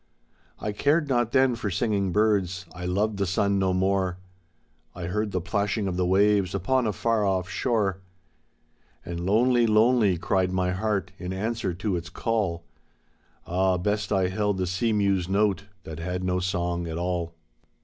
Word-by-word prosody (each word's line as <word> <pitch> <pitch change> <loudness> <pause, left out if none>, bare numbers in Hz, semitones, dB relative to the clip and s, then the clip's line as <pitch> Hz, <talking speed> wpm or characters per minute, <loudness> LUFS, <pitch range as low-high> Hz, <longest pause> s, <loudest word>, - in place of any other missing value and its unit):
I 105 - -3
cared 145 +8 +1
not 120 -3 +1
then 130 -2 +4
for 115 -3 -3
singing 100 0 0
birds, 100 -3 +1
I 90 0 -5
loved 100 +3 0
the 100 -1 0
sun 100 +2 +1
no 95 -1 +2
more. 95 -1 +1 0.8
I 90 - -6
heard 105 +4 -2
the 95 - 0
plashing 100 +4 -1
of 90 - -2
the 90 0 0
waves 100 0 +3
upon 120 +6 +1
a - - +1
far 115 +2 0
off 95 -2 0
shore. 95 0 0 1.0
And 85 0 -5
lonely, 120 +5 +3
lonely 110 -3 +4
cried 95 +1 0
my 90 -1 0
heart 100 0 -1
in 90 0 -5
answer 95 -1 -2
to 95 +1 -2
its 85 -1 -5
call 95 -5 -1 0.4
— - - -38
Ah, 95 +1 +1
best 105 +4 -1
I 95 -2 +2
held 105 0 0
the 95 - 0
sea 95 +6 0
mew's 100 -4 +1
note 100 -1 +1 0.2
that 80 0 -8
heA 90 +2 -3
no 90 0 0
song 85 -1 -2
at 80 0 -4
all! 85 -1 -2
95 Hz, 170 wpm, -26 LUFS, 90-105 Hz, 1.0 s, then